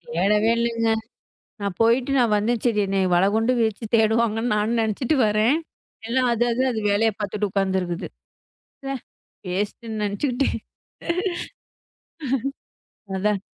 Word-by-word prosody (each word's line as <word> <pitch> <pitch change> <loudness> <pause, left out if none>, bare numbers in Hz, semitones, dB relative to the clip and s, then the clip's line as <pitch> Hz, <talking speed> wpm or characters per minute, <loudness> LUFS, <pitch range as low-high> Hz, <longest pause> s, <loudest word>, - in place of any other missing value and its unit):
தேடவே 210 +5 +3
இல்லங்க. 230 -1 +1 0.7
நான் 200 -2 -2
போயிட்டு 240 +4 +3
நான் 235 -3 +3
வந்தேன். 225 +2 0
சரி 230 -3 +2
என்னை 195 0 +1
வலை 175 +2 +4
கொண்டு 225 +3 +2
வீசித் 220 0 -2
தேடுவாங்கன்னு 225 +1 +2
நான் 215 +3 +1
நினைச்சுட்டு 225 +6 0
வரேன். 215 +7 +3 0.5
எல்லாம் 250 +1 +2
அதாது 240 +1 +1
அது 220 -2 -2
வேலைய 220 +2 +3
பாத்துட்டு 205 0 -2
உக்காந்துருக்குது. 190 -3 -1 0.8
ச்சே 270 - -4 0.6
வேஸ்ட்டுன்னு 215 +2 -3
நினைச்சுக்கிட்டேன். 245 +6 0 2.6
அதான். 205 +1 +1
220 Hz, 110 wpm, -23 LUFS, 205-235 Hz, 2.6 s, வலை